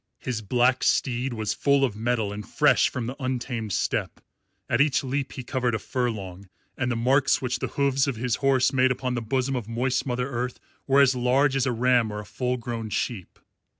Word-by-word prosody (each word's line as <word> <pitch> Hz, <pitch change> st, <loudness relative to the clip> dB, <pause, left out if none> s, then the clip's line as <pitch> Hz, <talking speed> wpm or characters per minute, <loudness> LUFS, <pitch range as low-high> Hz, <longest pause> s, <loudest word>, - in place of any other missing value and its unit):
His 120 Hz, -4 st, -4 dB
black 125 Hz, +4 st, +2 dB
steed 125 Hz, 0 st, +1 dB
was 110 Hz, -2 st, -1 dB
full 140 Hz, -1 st, +3 dB
of 115 Hz, -6 st, -4 dB
mettle 110 Hz, -2 st, -1 dB
and 105 Hz, +1 st, -6 dB
fresh -, -, +3 dB
from 125 Hz, -, -4 dB
the 125 Hz, +3 st, -5 dB
untamed 120 Hz, -4 st, -3 dB
steppe. -, -, -1 dB, 0.5 s
At 120 Hz, -, +2 dB
each 140 Hz, -2 st, +2 dB
leap 135 Hz, 0 st, -3 dB
he 130 Hz, -, -6 dB
covered 125 Hz, -1 st, -1 dB
a -, -, +1 dB
furlong, 100 Hz, -7 st, -4 dB, 0.3 s
and 130 Hz, -1 st, -1 dB
the -, -, 0 dB
marks 130 Hz, +4 st, +3 dB
which 125 Hz, -1 st, -2 dB
the -, -, -2 dB
hoofs 140 Hz, -1 st, +2 dB
of 135 Hz, -, -1 dB
his 120 Hz, +1 st, -1 dB
horse 135 Hz, -1 st, +2 dB
made 130 Hz, 0 st, +4 dB
upon 125 Hz, 0 st, -2 dB
the 120 Hz, -, -2 dB
bosom 130 Hz, +3 st, -1 dB
of 120 Hz, -4 st, -4 dB
moist 125 Hz, +3 st, -1 dB
Mother 125 Hz, 0 st, -1 dB
Earth 125 Hz, -1 st, -4 dB, 0.3 s
were 140 Hz, +1 st, +5 dB
as 135 Hz, -1 st, +5 dB
large 130 Hz, +3 st, +2 dB
as 135 Hz, 0 st, +1 dB
a -, -, +1 dB
ram 120 Hz, -1 st, +2 dB
or 105 Hz, -, -5 dB
a 105 Hz, -, -8 dB
full 125 Hz, +4 st, -2 dB
grown 115 Hz, -2 st, -5 dB
sheep. 105 Hz, -3 st, -3 dB
125 Hz, 210 wpm, -25 LUFS, 115-130 Hz, 0.5 s, were